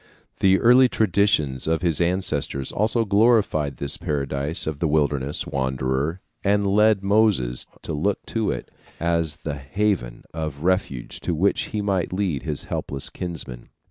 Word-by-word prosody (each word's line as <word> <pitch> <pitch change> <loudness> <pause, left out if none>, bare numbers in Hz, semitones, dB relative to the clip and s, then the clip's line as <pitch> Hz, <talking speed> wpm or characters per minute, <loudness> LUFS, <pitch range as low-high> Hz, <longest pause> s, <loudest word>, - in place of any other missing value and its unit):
The 95 0 +4
early 125 +2 +6
traditions 90 - +1
of 80 +2 0
his 85 -2 +2
ancestors 85 -6 0
also 110 +2 +1
glorified 100 - +2
this 70 - +2
paradise 70 +3 -2
of 75 -2 -3
the 80 - +1
wilderness 75 -2 0
wanderer 65 +5 -1 0.2
and 100 0 +2
led 105 0 +3
Moses 100 - +2 0.2
to - - -4
look 95 +7 -1
to 110 -3 -1
it - - -4 0.3
as 85 -2 0
the 75 -3 -5
haven 70 -4 -1
of 75 -2 -5
refuge 90 -9 -1
to 85 - -2
which 95 +6 +1
he 105 -1 -3
might 95 -4 0
lead 90 -8 -1
his 75 -3 -4
helpless 70 -1 -4
kinsmen. 80 -9 -6
85 Hz, 145 wpm, -23 LUFS, 70-100 Hz, 0.3 s, early